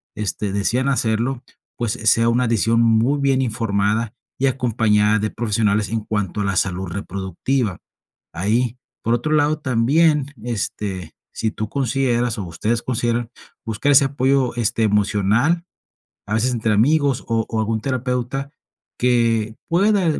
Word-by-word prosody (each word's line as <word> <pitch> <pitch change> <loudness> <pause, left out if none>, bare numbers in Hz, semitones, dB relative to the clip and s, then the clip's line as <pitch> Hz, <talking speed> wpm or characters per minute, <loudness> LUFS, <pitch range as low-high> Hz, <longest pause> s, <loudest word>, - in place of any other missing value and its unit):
este, 105 -1 -2
desean 120 +6 +1
hacerlo, 120 0 0 0.3
pues, 120 -4 -1
eh, 110 - -9
sea 115 +1 +4
una 125 +1 +2
decisión 115 0 +2
muy 115 +5 +3
bien 135 -1 +2
informada 110 -1 0 0.3
y 135 - +2
acompañada 110 -5 +2
de 110 +1 -2
profesionales 105 -2 0
en 115 -1 -1
cuanto 105 -2 -2
a - - -1
la 100 -1 -1
salud 95 +1 0
reproductiva. 100 +4 -2 0.6
Ahí, 115 +6 0 0.3
por 115 - +1
otro 120 +6 -1
lado, 150 +1 +2
también, 145 +3 +2
este, 100 -7 -4 0.2
si 110 - -2
tú 110 0 -5
consideras, 125 -2 0
o - - -3
ustedes 105 +7 -2
consideran 120 -1 -1 0.4
buscar 115 +5 0
ese 140 0 +6
apoyo, 135 -2 +1
este, 115 -1 0
emocional, 105 - +2 0.6
a 105 - -1
veces 125 +3 +1
entre 110 -2 0
amigos, 140 +4 +2
o 115 -1 0
o 110 - -1
algún 110 0 -1
terapeuta 130 +2 -2 0.5
que 115 -3 +1
pueda 190 +6 +3 0.2
d - - -3
115 Hz, 145 wpm, -21 LUFS, 105-130 Hz, 0.6 s, ese